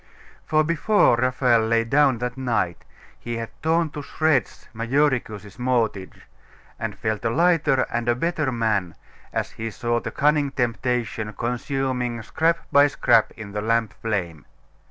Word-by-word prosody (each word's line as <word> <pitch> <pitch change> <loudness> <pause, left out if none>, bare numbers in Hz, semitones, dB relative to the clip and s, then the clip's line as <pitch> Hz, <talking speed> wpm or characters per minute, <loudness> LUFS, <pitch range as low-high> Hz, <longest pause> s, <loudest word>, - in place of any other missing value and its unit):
For 155 0 +3
before 170 - +3
Raphael 125 -1 +2
lay 115 0 +2
down 135 +1 +3
that 120 +1 -4
night, 120 -10 -2 0.3
he 120 -1 -5
had 115 -1 -5
torn 160 0 +1
to 150 - -6
shreds 155 0 0
Majoricus's 115 -4 -1
mortgage, 115 -6 -1 0.6
and - - -4
felt 110 0 -2
a 115 - +1
lighter 155 -1 +2
and 120 0 -2
a 120 - +3
better 155 0 -1
man 105 -8 -1 0.4
as - - -2
he 115 0 -5
saw 120 +2 -1
the - - -5
cunning 150 0 +2
temptation 115 -3 -2
consuming 125 0 -2
scrap 165 +7 0
by 145 +1 +6
scrap 120 -5 +3
in 110 -3 -8
the 105 +1 -3
lamp 115 -1 0
flame. 90 -9 -4
120 Hz, 145 wpm, -23 LUFS, 115-145 Hz, 0.6 s, by